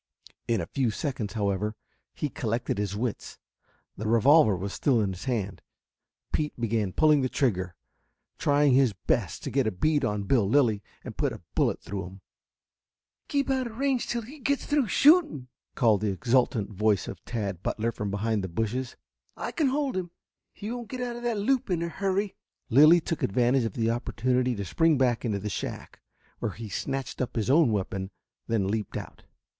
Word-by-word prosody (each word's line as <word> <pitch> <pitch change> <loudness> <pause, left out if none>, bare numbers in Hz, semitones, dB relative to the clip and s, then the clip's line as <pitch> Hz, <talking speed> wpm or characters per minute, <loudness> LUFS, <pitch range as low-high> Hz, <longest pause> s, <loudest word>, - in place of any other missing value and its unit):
In 115 -1 +1
a - - -2
few 130 -4 0
seconds, 120 -3 -3
however, 105 0 -1 0.4
he 150 - -1
collected 115 -6 -2
his 100 -1 -2
wits. 115 +1 -4 0.6
The 110 - -4
revolver 115 +1 +5
was 100 +2 -4
still 130 -5 +2
in 100 -3 0
his 90 - -9
hand. 110 -7 -2 0.7
Pete 150 -4 -1
began 110 -4 0
pulling 150 +5 +4
the 130 - 0
trigger, 95 -11 0 0.6
trying 145 -1 +3
his 130 -4 +4
best 95 - -1
to - - -4
get 135 -3 +1
a - - +1
bead 145 +10 +1
on 105 -4 -1
Bill 100 -1 +2
Lilly 115 -6 +3 0.2
and - - -8
put - - 0
a - - -11
bullet - - +1
through 95 -1 -4
him. 95 +1 -13 1.1
"Keep 280 -1 0
out 260 -2 0
of 225 -1 -10
range 270 -2 0
till 235 -1 -2
he 280 +7 -11
gets 280 +1 0
through 290 -5 +1
shooting!" 275 - +4 0.3
called 110 -4 +3
the 105 - +1
exultant 115 0 +1
voice 105 0 +1
of - - -8
Tad 100 -7 -4
Butler 115 +4 -1
from 105 -2 -4
behind 105 +1 -1
the - - -2
bushes. 115 +7 -3 0.4
"I - - -4
can 310 -4 +1
hold 275 -1 0
him. 185 -2 -2 0.4
He 210 +3 -6
won't 240 -2 -6
get 255 -1 -5
out 245 -1 -3
of - - -8
that 240 -2 -1
loop 240 +3 +1
in 170 -2 0
a 170 - -2
hurry." 195 +2 -1 0.4
Lilly 155 +7 +7
took 165 - -3
advantage 120 +4 +2
of 110 - -3
the 115 0 +1
opportunity 125 +1 0
to 100 -1 -4
spring 160 - +3
back 125 -3 +1
into 105 -3 0
the 100 +1 -5
shack, 100 - -5 0.4
where - - -2
he 110 -1 -8
snatched 135 +7 -3
up 130 0 -3
his 115 +2 +1
own 150 -4 +5
weapon, 95 -2 -2 0.4
then 110 -4 +1
leaped 105 0 -2
out. - - -9
120 Hz, 190 wpm, -27 LUFS, 105-160 Hz, 1.1 s, Lilly